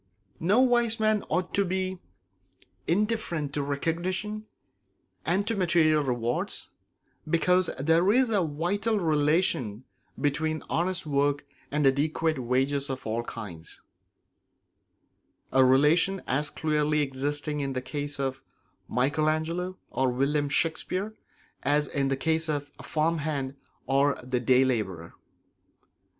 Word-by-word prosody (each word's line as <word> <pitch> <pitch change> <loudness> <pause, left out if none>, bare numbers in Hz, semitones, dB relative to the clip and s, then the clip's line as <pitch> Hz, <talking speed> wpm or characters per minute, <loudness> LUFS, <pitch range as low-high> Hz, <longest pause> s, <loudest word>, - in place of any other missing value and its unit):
No 200 +9 +3
wise 240 -3 +3
man 215 -1 +2
ought 180 0 -1
to 200 - +3
be 185 0 -2 0.9
indifferent 175 -7 0
to 145 - -1
recognition 180 +9 -2 0.8
and 195 +3 +2
to 225 - -1
material 165 -5 +3
rewards, 120 -2 -2 0.6
because 180 +2 +3
there 165 +7 +3
is 250 +1 +3
a 205 -3 +3
vital 180 +8 0
relation 150 - +1 0.4
between 155 +2 0
honest 180 +1 0
work 145 -1 +1 0.2
and 150 0 0
adequate 155 +2 +2
wages 135 +3 0
of 130 -1 -5
all 115 +1 -1
kinds; 90 -10 -8 1.7
a 130 +1 +5
relation 150 +9 +3
as 145 +3 0
clearly 150 0 +1
existing 145 +2 -2
in 135 -1 -2
the 130 - -1
case 145 +1 -3
of 135 -1 -2 0.4
Michael 145 +5 +1
Angelo 170 +4 -2
or 130 0 +1
of 125 - -3
William 145 +2 +1
Shakespeare 185 +7 -1 0.5
as 145 +1 +2
in 140 0 -1
the 135 0 0
case 160 +2 0
of 145 -1 -2
the - - -12
farmhand 155 -4 -1 0.3
or 140 +1 +2
the 125 0 -1
day 130 +2 +4
labourer. 95 -10 -2
150 Hz, 125 wpm, -27 LUFS, 135-175 Hz, 1.7 s, a